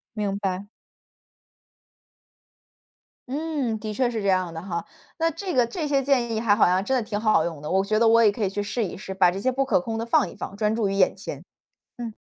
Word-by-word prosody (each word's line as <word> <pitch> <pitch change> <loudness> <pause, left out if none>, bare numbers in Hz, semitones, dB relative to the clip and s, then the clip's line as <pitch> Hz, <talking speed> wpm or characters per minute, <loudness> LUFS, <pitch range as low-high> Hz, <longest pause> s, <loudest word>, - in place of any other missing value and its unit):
明 205 -2 -1
白。 195 0 -3 2.6
嗯， 285 -6 -2
的 215 0 -5
确 250 +3 +1
是 225 -3 -3
这 - - 0
样 185 -2 +2
的 160 - -6
哈。 170 -1 -4 0.4
那 330 0 +3
这 345 +3 -5
个 250 - +4
这 305 +6 -3
些 280 -1 +2
建 255 -4 +1
议 - - 0
还 215 -3 +4
好 - - +5
像 185 +2 +2
真 265 +6 0
的 - - 0
挺 205 -3 -2
好 215 -1 +3
用 165 -4 -5
的。 150 - -6
我 190 +1 +2
觉 215 +1 +1
得 230 - +4
我 230 +1 +6
也 210 - +6
可 210 +2 -4
以 195 - +1
去 205 +1 -3
试 225 +3 -2
一 190 - -5
试， 190 0 -7
把 190 -2 +4
这 185 +2 -4
些 255 +6 +1
不 270 +2 0
可 275 +1 +2
控 225 -4 -4
的 230 - -2
放 - - +3
一 - - -13
放， 195 - -7
专 215 0 +1
注 220 -3 0
于 - - -2
眼 195 -2 +3
前。 - - -7 0.5
嗯。 240 -1 -4
215 Hz, 260 characters per minute, -25 LUFS, 195-250 Hz, 2.6 s, 我